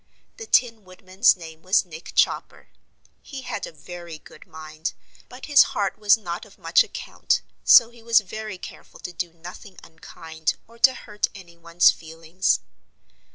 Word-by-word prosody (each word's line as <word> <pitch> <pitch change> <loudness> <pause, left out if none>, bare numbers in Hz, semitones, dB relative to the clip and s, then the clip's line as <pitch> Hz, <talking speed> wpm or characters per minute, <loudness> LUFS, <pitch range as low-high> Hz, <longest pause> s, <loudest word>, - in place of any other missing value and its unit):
The 450 - -9
Tin 230 - +2
Woodman's 185 +4 +2
name 160 -2 -11
was 185 +2 +2
Nick 165 -1 -11
Chopper. - - 0 0.5
He 275 -2 -9
had - - -5
a - - -10
very 170 +1 -10
good 155 - -17
mind, 155 +1 -6 0.4
but 250 +1 -10
his 290 -2 +6 0.2
heart 200 0 -1
was 210 +1 +5
not 175 -5 -6
of - - -17
much - - +3
account, - - -2 0.2
so 235 0 +7
he 235 -1 -17
was 230 0 +4
very 215 0 -7
careful - - -12
to 180 - -7
do 170 0 -4
nothing 175 +3 -12
unkind 160 -1 -5
or 230 +1 -19
to 260 +2 +5
hurt 210 -4 -3
anyone's 170 -2 +2
feelings. 165 +3 -2
185 Hz, 155 wpm, -23 LUFS, 165-220 Hz, 0.5 s, so